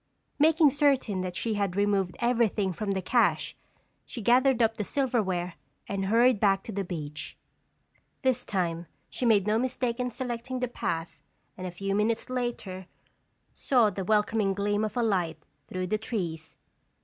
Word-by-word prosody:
Making 315 Hz, -1 st, +5 dB
certain 270 Hz, -9 st, +2 dB
that 180 Hz, -1 st, -4 dB
she 225 Hz, +3 st, -1 dB
had 200 Hz, -3 st, -1 dB
removed 200 Hz, -3 st, +1 dB
everything 230 Hz, -5 st, +1 dB
from 200 Hz, +3 st, -2 dB
the 190 Hz, -1 st, -2 dB
cache, 240 Hz, +5 st, +2 dB, 0.5 s
she 245 Hz, -, -8 dB
gathered 250 Hz, +3 st, +4 dB
up 225 Hz, -1 st, +2 dB
the 210 Hz, -, -1 dB
silverware 200 Hz, -9 st, 0 dB, 0.3 s
and 195 Hz, -1 st, -2 dB
hurried 230 Hz, +2 st, +4 dB
back 195 Hz, -2 st, +3 dB
to -, -, -7 dB
the 200 Hz, -1 st, -2 dB
beach. 150 Hz, -5 st, -6 dB, 0.9 s
This 255 Hz, -2 st, +2 dB
time 170 Hz, -4 st, -2 dB, 0.2 s
she 250 Hz, -, -1 dB
made 205 Hz, -4 st, +4 dB
no 215 Hz, +1 st, +2 dB
mistake 250 Hz, -1 st, -1 dB
in 250 Hz, 0 st, 0 dB
selecting 245 Hz, +1 st, -3 dB
the 250 Hz, -, 0 dB
path 165 Hz, -8 st, -4 dB, 0.3 s
and 185 Hz, 0 st, -5 dB
a -, -, -3 dB
few 195 Hz, +3 st, -3 dB
minutes 220 Hz, +4 st, 0 dB
later 225 Hz, -7 st, -3 dB, 0.7 s
saw 240 Hz, -6 st, +3 dB
the 195 Hz, 0 st, -4 dB
welcoming 210 Hz, 0 st, +1 dB
gleam 205 Hz, +1 st, 0 dB
of 215 Hz, +3 st, -3 dB
a 240 Hz, -, +2 dB
light 180 Hz, -7 st, 0 dB, 0.3 s
through 185 Hz, 0 st, -3 dB
the 215 Hz, +4 st, -1 dB
trees. 165 Hz, -9 st, -4 dB
210 Hz, 160 wpm, -28 LUFS, 190-240 Hz, 0.9 s, Making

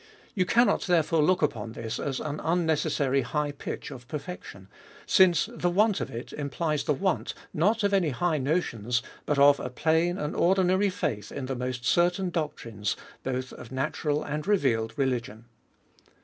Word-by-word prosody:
You 185 Hz, -3 st, +1 dB
can 235 Hz, +5 st, +5 dB
not, -, -, +2 dB
therefore, 165 Hz, -2 st, +3 dB
look 180 Hz, +3 st, +3 dB
upon 115 Hz, -6 st, -1 dB
this 115 Hz, 0 st, -4 dB
as 135 Hz, -2 st, -2 dB
an 150 Hz, 0 st, -4 dB
unnecessary, 155 Hz, -5 st, +1 dB
high' 145 Hz, +3 st, -1 dB
pitch 140 Hz, -, -6 dB
of 120 Hz, -1 st, -10 dB
perfection, 145 Hz, -, -7 dB, 0.4 s
since 185 Hz, 0 st, +5 dB
the 175 Hz, -6 st, 0 dB
want 205 Hz, +3 st, +2 dB
of -, -, -3 dB
it 120 Hz, -1 st, -7 dB
implies 150 Hz, +1 st, -2 dB
the 150 Hz, -, +2 dB
wanty 190 Hz, +1 st, -1 dB, 0.2 s
not 210 Hz, +8 st, +2 dB
of 200 Hz, 0 st, +2 dB
any 185 Hz, -5 st, +3 dB
high 155 Hz, +4 st, 0 dB
notions, 125 Hz, -, 0 dB, 0.2 s
but 150 Hz, -, +1 dB
of 140 Hz, 0 st, +6 dB
a 125 Hz, -, -4 dB
plain 160 Hz, +7 st, +1 dB
and 150 Hz, -3 st, -3 dB
or 180 Hz, +3 st, +4 dB
dinary 190 Hz, +1 st, +2 dB
faith 125 Hz, -, -3 dB
in 140 Hz, -, -4 dB
the 135 Hz, 0 st, -3 dB
most 125 Hz, 0 st, -4 dB
certain 175 Hz, +5 st, +2 dB
doctrines 115 Hz, -, -3 dB, 0.3 s
both 130 Hz, 0 st, -3 dB
of 120 Hz, -, -11 dB
na 130 Hz, +3 st, 0 dB
tural 150 Hz, -1 st, -2 dB
and 150 Hz, +3 st, -3 dB
revealed 125 Hz, -, +2 dB
religion. 120 Hz, -5 st, -2 dB
150 Hz, 175 wpm, -27 LUFS, 130-175 Hz, 0.4 s, of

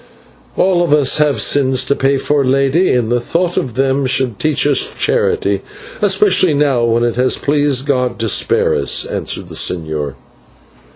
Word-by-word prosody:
"We -, -, +1 dB
all 185 Hz, -2 st, +2 dB
of 165 Hz, -4 st, 0 dB
us 145 Hz, -1 st, +2 dB
have 150 Hz, -2 st, +1 dB
sins 130 Hz, -2 st, +2 dB
to 140 Hz, -, 0 dB
pay 135 Hz, 0 st, +1 dB
for, 145 Hz, +1 st, 0 dB
Lady, 135 Hz, +7 st, +1 dB
and 120 Hz, -2 st, -1 dB
the 120 Hz, -, +1 dB
thought 175 Hz, +7 st, -2 dB
of 125 Hz, -4 st, -3 dB
them 135 Hz, +1 st, 0 dB
should 125 Hz, -5 st, -1 dB
teach 155 Hz, -2 st, 0 dB
us 145 Hz, -2 st, +1 dB
charity, 100 Hz, 0 st, 0 dB, 0.4 s
especially 195 Hz, -5 st, +2 dB
now 140 Hz, -4 st, +1 dB
when 115 Hz, 0 st, +1 dB
it 120 Hz, 0 st, -1 dB
has 125 Hz, +1 st, +1 dB
pleased 145 Hz, -2 st, 0 dB
God 125 Hz, -4 st, -1 dB
to 115 Hz, -, -2 dB
spare -, -, +1 dB
us," 70 Hz, -2 st, +1 dB
answered -, -, -4 dB
the -, -, -11 dB
señor. 80 Hz, -5 st, -2 dB
135 Hz, 175 wpm, -15 LUFS, 120-150 Hz, 0.4 s, all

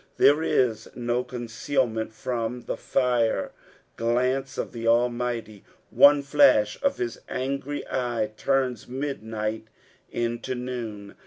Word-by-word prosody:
There 145 Hz, +2 st, +5 dB
is 115 Hz, -8 st, +1 dB
no 120 Hz, 0 st, -1 dB
conceal 125 Hz, +2 st, -1 dB
ment 110 Hz, -1 st, -4 dB
from 120 Hz, +1 st, -3 dB
the -, -, -4 dB
fire 120 Hz, -3 st, +1 dB, 0.5 s
glance 125 Hz, +3 st, 0 dB
of -, -, -3 dB
the 115 Hz, -2 st, -6 dB
AInughty 120 Hz, -2 st, 0 dB, 0.2 s
— -, -, -38 dB
one 145 Hz, 0 st, +7 dB
flash 135 Hz, -7 st, +4 dB
of 280 Hz, 0 st, +1 dB
hia 120 Hz, -, -1 dB, 0.2 s
angry 140 Hz, +2 st, -3 dB
eye 120 Hz, -4 st, -1 dB
turns 130 Hz, -1 st, 0 dB
midnight 110 Hz, -5 st, -4 dB, 0.4 s
into 120 Hz, +2 st, -2 dB
noon. 115 Hz, -5 st, -5 dB
120 Hz, 120 wpm, -26 LUFS, 115-130 Hz, 0.5 s, one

